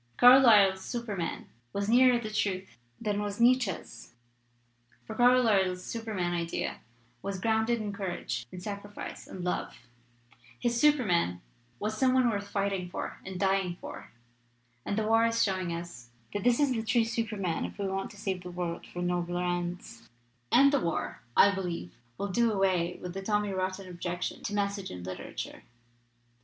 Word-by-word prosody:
Carlyle's 225 Hz, -7 st, +7 dB
Superman 215 Hz, -8 st, -4 dB, 0.3 s
was 200 Hz, 0 st, -1 dB
nearer 250 Hz, +2 st, +6 dB
the 215 Hz, -2 st, -5 dB
truth 190 Hz, -, -2 dB, 0.2 s
than 210 Hz, -2 st, -1 dB
was 205 Hz, 0 st, -4 dB
Nietz 255 Hz, +2 st, +6 dB
sche's, 185 Hz, -8 st, -7 dB, 0.9 s
for -, -, -6 dB
Carlyle's 220 Hz, -7 st, +4 dB
Superman 210 Hz, -7 st, -2 dB
idea 170 Hz, -1 st, -2 dB, 0.4 s
was 195 Hz, -1 st, -4 dB
grounded 220 Hz, +3 st, +1 dB
in 210 Hz, -2 st, -4 dB
courage 175 Hz, -, -4 dB
and 180 Hz, -, -8 dB
sacrifice 205 Hz, 0 st, -7 dB
and 185 Hz, -, -7 dB
love; 180 Hz, -, -2 dB, 0.8 s
his 235 Hz, -1 st, 0 dB
Superman 195 Hz, -, +3 dB, 0.4 s
was 215 Hz, -, -2 dB
some 260 Hz, -1 st, +4 dB
one 255 Hz, -1 st, +4 dB
worth 200 Hz, -1 st, -3 dB
fighting 195 Hz, -3 st, -1 dB
for -, -, -5 dB
and 190 Hz, -1 st, -6 dB
dying 190 Hz, -2 st, +1 dB
for. -, -, -9 dB, 0.8 s
And 200 Hz, -, -1 dB
the 220 Hz, -, +1 dB
war 225 Hz, +1 st, +4 dB
is 230 Hz, 0 st, +2 dB
showing 185 Hz, -3 st, -1 dB
us 170 Hz, -8 st, -7 dB, 0.2 s
that 205 Hz, -, -2 dB
this 240 Hz, 0 st, +3 dB
is 290 Hz, -2 st, +3 dB
the 225 Hz, -, -1 dB
true 225 Hz, +1 st, +2 dB
Superman, 210 Hz, -7 st, -2 dB
if -, -, -6 dB
we 200 Hz, -, -2 dB
want 195 Hz, 0 st, -2 dB
to 205 Hz, -, -14 dB
save 190 Hz, -3 st, -3 dB
the 180 Hz, -, -8 dB
world 175 Hz, -1 st, -4 dB
for 175 Hz, -, -5 dB
nobler 175 Hz, 0 st, -1 dB
ends. 175 Hz, -10 st, -4 dB, 0.4 s
"And 280 Hz, +3 st, +6 dB
the 285 Hz, -, +4 dB
war, 170 Hz, -8 st, -2 dB, 0.2 s
I 200 Hz, -, +7 dB
believe, 175 Hz, -, -4 dB, 0.2 s
will 200 Hz, -, -3 dB
do 230 Hz, +4 st, +2 dB
away 185 Hz, -3 st, +1 dB
with 180 Hz, -1 st, -6 dB
the 195 Hz, -, -4 dB
tommy 210 Hz, 0 st, 0 dB
rotten 185 Hz, 0 st, -2 dB
objection 175 Hz, 0 st, -4 dB
to 205 Hz, -, -3 dB
'message' 200 Hz, -1 st, -1 dB
in 90 Hz, -1 st, -7 dB
literature. 90 Hz, +1 st, -6 dB
195 Hz, 165 wpm, -30 LUFS, 180-225 Hz, 0.9 s, Carlyle's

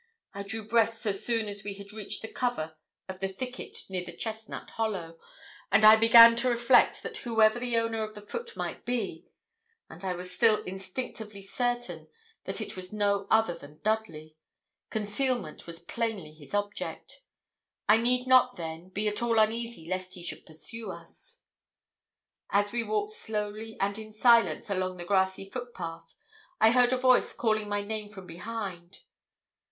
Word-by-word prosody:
I 200 Hz, -, -5 dB
drew 220 Hz, +2 st, -5 dB
breath 225 Hz, 0 st, +3 dB
so 220 Hz, -2 st, -1 dB
soon 225 Hz, +2 st, 0 dB
as 205 Hz, -1 st, -5 dB
we 205 Hz, -1 st, -5 dB
had 200 Hz, 0 st, -9 dB
reached 210 Hz, -1 st, -3 dB
the -, -, -4 dB
cover 160 Hz, -11 st, -2 dB, 0.3 s
of 190 Hz, -1 st, -7 dB
the 195 Hz, -, -1 dB
thicket 250 Hz, +7 st, -6 dB
near 185 Hz, -2 st, -3 dB
the -, -, -8 dB
chestnut 220 Hz, -1 st, -6 dB
hollow, 185 Hz, -7 st, -3 dB, 0.5 s
and 205 Hz, +2 st, +6 dB
I 215 Hz, +1 st, +11 dB
began 230 Hz, +1 st, +9 dB
to 250 Hz, +2 st, +2 dB
reflect 240 Hz, +1 st, +4 dB
that -, -, -5 dB
whoever 225 Hz, -1 st, +3 dB
the 240 Hz, -1 st, -1 dB
owner 230 Hz, -1 st, 0 dB
of 215 Hz, 0 st, -4 dB
the 210 Hz, -, -10 dB
foot 465 Hz, -, -5 dB
might -, -, -4 dB
be 245 Hz, -1 st, -3 dB, 0.6 s
and 175 Hz, -, -12 dB
I 185 Hz, -1 st, -1 dB
was 180 Hz, +1 st, -5 dB
still 220 Hz, 0 st, +3 dB
instinctively 200 Hz, +2 st, -6 dB
certain 245 Hz, +4 st, -2 dB, 0.4 s
that -, -, -2 dB
it -, -, -5 dB
was 185 Hz, -1 st, -5 dB
no 200 Hz, -1 st, 0 dB
other 220 Hz, -5 st, +3 dB
than 150 Hz, -2 st, -13 dB
Dudley 185 Hz, -8 st, -2 dB, 0.5 s
concealment 220 Hz, -, -2 dB
was 165 Hz, 0 st, -4 dB
plainly 195 Hz, -4 st, -4 dB
his 155 Hz, +4 st, -8 dB
object. 205 Hz, -, -4 dB, 0.7 s
I 210 Hz, -, +7 dB
need 250 Hz, +2 st, +3 dB
not, 255 Hz, -1 st, +5 dB
then, 165 Hz, +1 st, -6 dB
be 205 Hz, +3 st, -2 dB
at 210 Hz, +1 st, +1 dB
all 235 Hz, -1 st, +1 dB
uneasy 225 Hz, -4 st, 0 dB
lest 185 Hz, +1 st, -4 dB
he 175 Hz, -, -9 dB
should -, -, -5 dB
pursue 160 Hz, +9 st, -4 dB
us. 485 Hz, +1 st, -11 dB, 1.1 s
As 205 Hz, +1 st, +2 dB
we 235 Hz, -, 0 dB
walked 210 Hz, -1 st, -1 dB
slowly 215 Hz, +1 st, -3 dB
and 200 Hz, +2 st, 0 dB
in 215 Hz, 0 st, -9 dB
silence 230 Hz, +2 st, +4 dB
along 185 Hz, -1 st, -1 dB
the 175 Hz, -, -7 dB
grassy 190 Hz, 0 st, +1 dB
footpath, 175 Hz, -9 st, -7 dB, 0.4 s
I 220 Hz, -, +6 dB
heard 245 Hz, 0 st, +5 dB
a 255 Hz, -, +2 dB
voice 255 Hz, 0 st, +4 dB
calling 215 Hz, -2 st, 0 dB
my 205 Hz, 0 st, -1 dB
name 210 Hz, 0 st, -4 dB
from 195 Hz, -3 st, -10 dB
behind. 180 Hz, 0 st, -7 dB
215 Hz, 170 wpm, -29 LUFS, 190-230 Hz, 1.1 s, I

